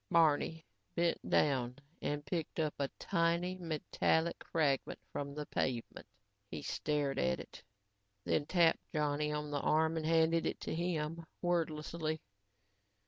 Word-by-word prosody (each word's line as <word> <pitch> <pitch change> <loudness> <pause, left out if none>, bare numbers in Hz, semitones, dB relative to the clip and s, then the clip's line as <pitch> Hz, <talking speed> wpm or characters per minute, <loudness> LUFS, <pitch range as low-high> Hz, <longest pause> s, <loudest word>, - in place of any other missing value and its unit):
Barney 160 0 +3 0.3
bent 170 0 +1
down 125 -4 +3 0.3
and 145 0 -2
picked 165 +2 -3
a 155 -2 +1 0.2
tiny 170 +2 +1
metallic 165 0 0
fragment 145 -5 +1
from 140 0 -4
the 150 0 -3
pavement. 120 -5 -2 0.4
He - - -5
stared 145 -2 0
at 65 0 +2
it - - -10 0.6
and - - +1
then 145 - +2
tapped 170 -3 +4
Johnny 150 -1 +1
on 150 0 -3
the 145 - 0
arm 160 +1 +3
and 160 - -2
handed 165 0 +4
it - - -2
to - - -3
him, 165 -1 -1 0.2
wordlessly. 160 -2 0
155 Hz, 135 wpm, -35 LUFS, 145-165 Hz, 0.6 s, tapped